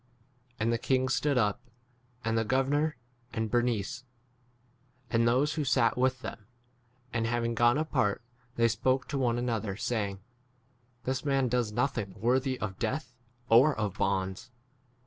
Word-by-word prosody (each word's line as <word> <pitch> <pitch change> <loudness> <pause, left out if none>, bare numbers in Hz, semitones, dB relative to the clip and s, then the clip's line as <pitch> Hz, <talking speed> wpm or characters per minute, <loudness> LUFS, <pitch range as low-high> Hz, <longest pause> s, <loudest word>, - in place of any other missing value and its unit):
Andi 110 +2 +1
the 115 - +2
king 130 +1 +1
stood 140 0 +1
up, 105 -4 +1 0.6
and 115 0 +1
the 115 - +2
gover 130 +4 +1
nor 150 +1 +1 0.4
and 110 -2 -2
Bernice, 120 0 0 1.1
and 115 0 +3
those 135 +6 +2
who 155 - -1
31 - - -5
sat 115 -1 +3
with 130 0 +1
them, 105 -3 -8 0.7
and 115 -1 0
having 115 0 0
gone 120 +3 +4
apart, 130 -9 0 0.3
they 115 0 +4
spoke 130 +4 +1
to 140 - -1
one 120 -2 +1
another, 115 -5 -2
saying, 100 -5 -2 0.8
This 130 0 -2
man 135 -3 +1
does 120 -3 0
nothing 120 -4 -1
32 105 - -16
worthy 130 +4 +1
of 95 -3 -4
death 135 -2 -2 0.3
or 130 +6 +6
of 105 -3 -3
bonds. 95 +3 -1
120 Hz, 155 wpm, -30 LUFS, 110-130 Hz, 1.1 s, or